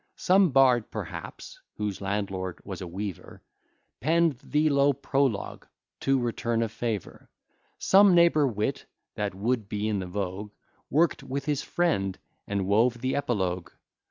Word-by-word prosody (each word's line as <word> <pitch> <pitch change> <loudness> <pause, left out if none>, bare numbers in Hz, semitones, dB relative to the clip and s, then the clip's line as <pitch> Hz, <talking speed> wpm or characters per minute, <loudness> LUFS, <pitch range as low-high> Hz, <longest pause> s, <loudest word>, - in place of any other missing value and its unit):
Some 190 0 +4
bard, 130 -4 +4
perhaps, - - -7 0.2
whose 105 -2 -3
landlord 95 -2 -3
was 95 -2 -6
a 90 - -5
weaver, 95 +1 -7 0.6
Penn'd 160 0 +2
the 150 +1 +1
low 140 0 +4
prologue 135 -5 -1 0.3
to 135 0 +2
return 120 -1 -1
a 115 - -2
favour: 110 -3 -5 0.5
Some 195 -1 +6
neighbour 170 -4 +5
wit, 105 -4 -2 0.3
that - - -3
would 110 +1 -1
be 105 +1 -2
in 105 -2 0
the 95 - -4
vogue, 100 +2 -4 0.4
Work'd 160 +2 +2
with 135 0 -4
his 145 -2 0
friend, 125 - 0 0.3
and 100 -1 -1
wove 115 +5 +2
the 130 0 0
epilogue. 95 -11 -1
115 Hz, 140 wpm, -27 LUFS, 100-140 Hz, 0.6 s, Some